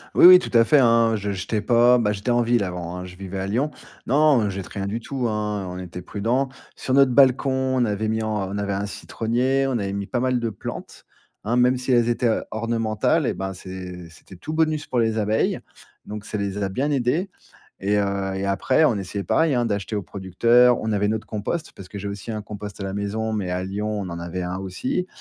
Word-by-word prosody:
Oui, - - +7
oui 180 0 +11
tout 155 - -6
à 115 - +7
fait, 145 +6 +4
hein, 115 -2 +4
je 100 -1 -3
j'étais 100 +2 -2
pas, 120 +2 +5
bah, 105 -4 +1
j'étais 100 +3 -3
en 120 0 +3
ville 120 -2 +2
avant, 90 -1 -5
hein, 90 - -6
je 90 0 -11
vivais 95 0 -6
à 95 - -3
Lyon. 130 +9 0 0.3
Non, 145 +1 +4
non, 110 - +2
on 100 - 0
jette 95 -1 -5
rien 100 -1 -5
du 105 +4 -3
tout, 125 +1 -3
hein, 105 -2 -2
on 90 0 -6
était 90 0 -7
prudents. 115 +9 -1 0.3
Sur 130 - -3
notre 135 -1 +5
balcon, 135 +1 +4 0.3
on 125 - +3
avait 105 0 -1
mis 110 0 0
en 105 -3 -2
on 100 - -4
avait 100 -1 -2
un 100 +1 -2
citronnier, 125 +6 -1
on 135 - -1
avait 100 -5 -2
mis 100 0 -3
pas 125 - -1
mal 125 0 +1
de 115 -1 -1
plantes, 105 - -8 0.4
hein, 115 +3 0
même 125 +1 +4
si 125 +1 -3
elles 120 -1 +4
étaient, 120 +1 +1
heu, 110 - +1
ornementales 115 +6 0
eh - - 0
ben, 95 0 -4
c'est 90 -1 -8
c'était 80 +3 -15
tout 155 - -7
bonus 155 -1 +1
pour 125 - 0
les 115 -1 +1
abeilles, 110 +1 +1 0.5
donc 105 0 -7
ça 105 - -4
les 100 0 -3
a 95 - 0
bien 135 +10 -1
aidées. 140 +8 0 0.5
Et 100 +2 +1
heu, 100 -1 -1
et 95 - -2
après, 100 +10 +2
on 120 -8 +3
essayait, 100 +1 -4
pareil 160 -2 +2
hein, 120 -1 +1
d'acheter 105 0 -2
aux 100 - -2
producteurs, 115 +7 +3
on 110 0 -2
avait 105 0 +1
notre 110 0 -2
compost- 110 +10 -4
parce 95 - -11
que 100 - -7
j'ai 100 - -6
aussi 100 +3 -6
un 110 -1 -3
compost 105 -1 -8
à - - -3
la 95 0 -4
maison, 105 +2 -2
mais 100 -4 -2
à 90 +1 -2
Lyon, 105 +2 -3
on 95 - -5
en 85 - -5
avait 85 +2 -4
un 90 +1 -3
aussi- 95 - -3
105 Hz, 245 wpm, -23 LUFS, 100-120 Hz, 0.5 s, oui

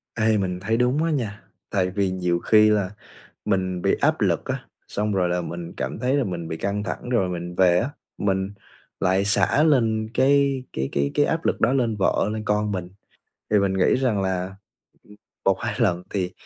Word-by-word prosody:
Ê, 110 -1 +2
mình 90 -2 -2
thấy 110 +5 0
đúng 125 +5 +2
á 165 - +1
nha, 115 -8 -3 0.3
tại 95 -3 +1
vì 95 0 0
nhiều 90 -2 0
khi 110 +3 +5
là 105 -3 +1 0.6
mình 95 -3 -1
bị - - +3
áp - - +2
lực - - +1
á, - - -4 0.2
xong 105 +1 -1
rồi 95 -3 +1
là 90 0 0
mình 85 0 -6
cảm - - -3
thấy 125 +3 0
là 140 - +2
mình 85 -5 -4
bị 80 - -4
căng 100 +3 -2
thẳng 115 - -5
rồi 120 -7 +1
mình 90 0 -5
về 90 -1 +4
á 120 +9 -1 0.3
mình 95 -1 0 0.5
lại 95 +2 +2
xả 100 +7 +3
lên 115 -8 +2
cái 140 0 +3
cái 65 +1 -2
cái 70 0 0
cái 145 - +3
áp 165 0 -1
lực - - 0
đó - - +3
lên 120 -5 +1
vợ, 100 0 +1
lên 110 0 -3
con 105 0 0
mình. 90 -2 -4 0.6
Thì 105 - +4
mình 100 -1 +1
nghĩ 95 -1 +3
rằng 125 -7 +1
là 95 0 -2 0.9
1-2 95 -1 +1
lần 90 -7 +1
thì 95 -3 -2
100 Hz, 200 wpm, -24 LUFS, 90-115 Hz, 0.9 s, khi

